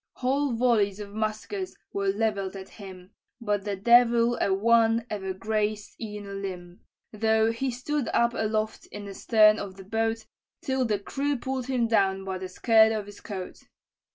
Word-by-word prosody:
"Whole 270 +1 0
volleys 225 -4 +2
of 205 -1 -8
muskets 220 - -3 0.2
were 200 0 -1
levell'd 200 -1 -1
at 190 0 -8
him, 190 -2 -12 0.3
But 205 -3 -1
the 205 -1 -2
devil 235 +2 +4
a - - +2
one 225 +3 +3
ever 190 -2 -3
grazed 210 +1 -2
e'en 210 -2 -6
a 200 - -8
limb, 180 -3 -7 0.3
Though 220 +1 +2
he 260 +4 -2
stood 260 +3 -2
up 235 0 +2
aloft 215 -1 -2
in 205 0 -8
the 200 - -7
stern 215 0 +4
of 195 -2 -6
the 195 - -11
boat, 225 +1 -1 0.4
Till 265 -1 0
the 215 -3 +1
crew 280 +7 -2
pull'd 260 0 -4
him 250 -3 +1
down 195 -3 +1
by 190 -1 -4
the 185 0 -6
skirt 220 +3 +4
of 215 -2 -2
his 205 0 -12
coat. 190 -4 -7
215 Hz, 175 wpm, -27 LUFS, 200-235 Hz, 0.4 s, devil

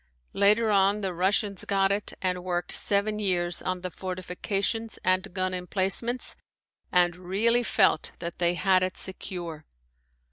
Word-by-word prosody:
Later 210 +3 +4
on 200 +1 +3
the 190 -2 -2
Russians 195 +2 0
got 195 -1 +1
it 200 +1 -2
and 180 -1 -1
worked 175 -1 -2
seven 210 +1 +2
years 175 -4 +1
on 185 -1 -3
the 185 0 -5
fortifications 195 +5 -3
and 185 +2 +1
gun 185 0 -2
emplacements 195 +7 0 0.6
and 175 -1 +3
really 200 +7 +1
felt 195 -8 +2
that 170 -1 -6
they 175 0 +2
had 185 0 +3
it 185 0 -2
secure. 175 -4 -4
185 Hz, 140 wpm, -27 LUFS, 180-200 Hz, 0.6 s, Later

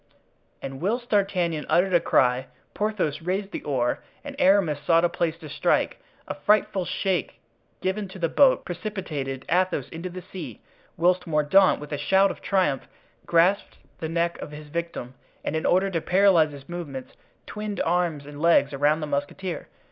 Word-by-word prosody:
And 135 0 -6
whilst 235 +6 -2
D'Artagnan 180 -6 +1
uttered 185 +2 +3
a 175 - +6
cry, 130 -5 +2 0.3
Porthos 190 -8 -1
raised 190 +4 -2
the - - -5
oar, 125 -4 0 0.2
and 285 -1 -7
Aramis 185 -6 +4
sought 165 +2 +4
a - - +2
place 170 -1 -1
to 160 -2 -10
strike, - - 0 0.3
a - - -3
frightful 190 +3 +1
shake 185 -5 -2 0.4
given 190 +2 -1
to 190 - -11
the 170 -2 0
boat 265 - +4
precipitated 165 -9 -5
Athos 180 -6 +1
into 170 +3 -6
the 180 0 -8
sea; 160 - -8 0.4
whilst 180 +1 +2
Mordaunt, 160 +5 +4
with 150 0 -9
a 145 - -2
shout 195 +6 +3
of - - -10
triumph, 180 -9 0 0.4
grasped 175 +4 +2 0.2
the 160 - -3
neck 170 +1 -1
of - - -6
his 150 0 -10
victim, 170 -6 -4 0.3
and - - -1
in 160 - 0
order 190 +2 +3
to 165 -3 -1
paralyze 180 -4 +4
his 140 -1 -12
movements, 150 -7 -7 0.3
twined 210 -1 -5
arms 165 -4 0
and 145 0 -9
legs 165 -4 +4
around 145 +3 +2
the - - -2
musketeer. 145 +5 -3
170 Hz, 170 wpm, -25 LUFS, 150-190 Hz, 0.4 s, a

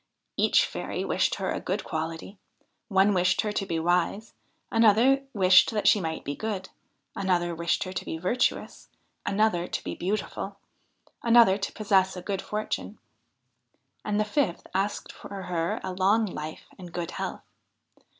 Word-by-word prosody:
Each - - +4
fairy - - -4
wished - - +1
her - - -2
a - - -2
good - - -3
quality. 160 +5 -5 0.5
One 195 0 +4
wished 180 -1 +2
her 210 - -2
to 205 -1 -2
be 165 - -1
wise; 180 +6 0 0.4
another 230 +5 +4
wished 190 -3 +6
that 210 -2 0
she 210 - +5
might 160 -2 -4
be 145 - -3
good; 200 -2 -4 0.5
another 180 -3 0
wished 170 +1 0
her 185 - -7
to 185 - -3
be 160 - -4
virtuous; 210 +9 -1 0.4
another 195 -4 +1
to - - -4
be - - -4
beautiful; 200 +1 -3 0.6
another 230 -4 +6
to 195 - -3
possess 190 -3 +2
a 180 - -7
good 195 0 -2
fortune; 215 0 -4 1.1
and 210 0 -1
the 215 - +2
fifth 210 - -1
asked 195 +2 -1
for 195 -1 -8
her 170 -2 -1
a 185 - -3
long 200 +5 +3
life 155 -5 -6
and 175 -2 -10
good 175 -2 -3
health. - - -5
190 Hz, 160 wpm, -27 LUFS, 175-210 Hz, 1.1 s, wished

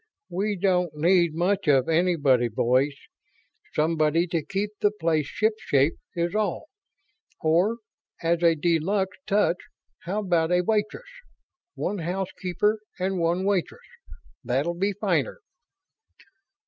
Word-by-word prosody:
"We 200 +4 -1
don't 180 -4 +1
need 170 0 +3
much 185 +2 0
of 135 -3 +4
anybody, 160 -7 +3
boys. 130 +5 +1 0.8
Somebody 155 +1 +2
to 165 -2 -1
keep 200 +3 -3
the 205 - +3
place 160 -7 -1
shipshape, 170 -10 +1 0.2
is 170 +1 -1
all. 215 - -2 0.7
Or, 175 +8 +2 0.5
as 170 +1 +1
a 165 -1 +4
de 165 +1 +1
luxe 190 +3 -1
touch, 200 -4 +2 0.5
how 200 +5 -1
about 175 -4 +1
a 180 0 +4
waitress? 215 - -1 0.7
One 205 +1 -2
housekeeper 190 +4 -1 0.2
and 190 0 -1
one 170 +3 0
waitress. 200 - -1 0.6
That'll 135 +8 0
be 195 +4 -1
finer." 355 - -1
175 Hz, 120 wpm, -25 LUFS, 160-200 Hz, 0.8 s, of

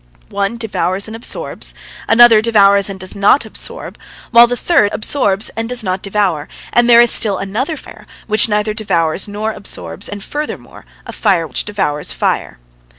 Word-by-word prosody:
One 200 +3 -2
devours 195 -4 -2
and 220 - -8
absorbs, 230 - -3 0.3
another 225 -1 +6
devours 200 -3 +3
and 195 -1 -7
does 185 +2 -5
not 200 +8 +3
absorb, - - -3 0.3
while 235 0 +7
the 245 +1 -3
third 285 -11 +2
absorbs 210 -4 +1
and 225 0 -4
does 245 -2 -2
not 185 -1 -3
devour, 195 -7 -1 0.3
and 240 0 +3
there 235 0 +8
is 240 - +3
still 205 -4 +1
another 250 - -3
fire, - - -13 0.2
which 215 +1 +3
neither 210 0 0
devours 190 -5 -1
nor 210 +2 -4
absorbs, 85 - -2
and 205 -1 -7
furthermore 300 +1 -7 0.2
a - - -8
fire 190 -6 +1
which 135 -6 -1
devours 190 -8 -3
fire. - - -2
210 Hz, 165 wpm, -15 LUFS, 195-230 Hz, 0.3 s, there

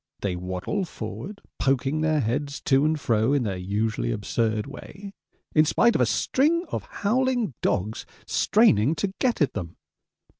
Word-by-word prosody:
They 95 -3 -1
waddle 90 - -3
forward, 200 +3 -7 0.2
poking 135 +3 +1
their 155 -1 +2
heads 140 +5 -2
to 135 +1 +3
and 155 0 +1
fro 115 0 +2
in 140 -3 +2
their 100 -4 -2
usually 95 - -1
absurd 110 - -1
way, 190 +8 -10 0.4
in 155 - +6
spite 235 +9 +3
of - - +1
a 125 - +4
string 300 - +1
of - - -4
howling 245 - 0
dogs 105 +3 -1 0.2
straining 160 - +3
to 190 +5 -2
get 245 -8 +1
at 145 - -1
them. 85 -1 -6
140 Hz, 155 wpm, -25 LUFS, -, 0.4 s, in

